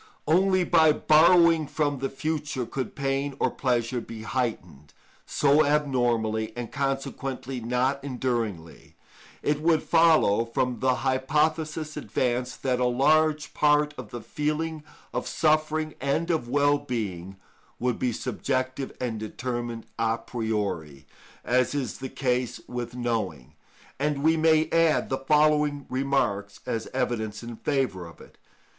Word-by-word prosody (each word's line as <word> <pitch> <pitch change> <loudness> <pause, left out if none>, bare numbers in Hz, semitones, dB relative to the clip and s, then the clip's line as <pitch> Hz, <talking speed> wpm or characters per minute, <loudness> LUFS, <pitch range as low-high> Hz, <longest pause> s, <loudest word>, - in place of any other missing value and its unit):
Only 185 +3 +3
by 160 -3 +5
borrowing 165 0 +5
from 145 -2 -1
the 135 +1 -2
future 145 -2 -3
could 130 +2 -5
pain 135 0 -1
or - - +1
pleasure 120 -1 -1
be 115 -1 -9
heightened 110 - -4 0.3
so 145 +2 +4
abnormally, 120 -7 +1
and 120 -2 -5
consequently 135 -2 -3
not 125 +4 0
enduringly. 115 - -4 0.5
It 150 0 0
would 160 -1 +3
follow, 160 -10 +4
from 125 +2 -1
the 130 -1 +2
hypothesis 155 +3 0
advanced, 125 0 -2
that 125 -2 +1
a 125 - +2
large 155 +5 +2
part 150 0 +3
of 125 -6 -8
the 120 - -7
feeling 155 +3 -2 0.3
of - - -2
suffering 155 0 +1
and 160 +5 0
of 155 -8 -1
well 145 +2 +3
being 95 -8 -4 0.4
would 125 -1 -1
be 125 - +1
subjective 130 +3 -2
and 120 -4 -3
determined 120 +1 -4
a 115 0 +1
priori, 105 - -3 0.4
as 125 +3 +2
is 130 -6 -3
the 130 - -5
case 125 -2 -1
with 120 -1 -5
knowing; 110 - -3 0.5
and 145 0 -1
we 160 +1 +4
may 160 0 +3
add 165 -2 +3
the 130 - -1
following 150 0 +2
remarks 125 -7 -1
as 110 -1 -3
evidence 115 -4 -2
in 120 0 -7
favour 125 - -1
of 85 - -15
it. - - -17
130 Hz, 135 wpm, -26 LUFS, 120-150 Hz, 0.5 s, by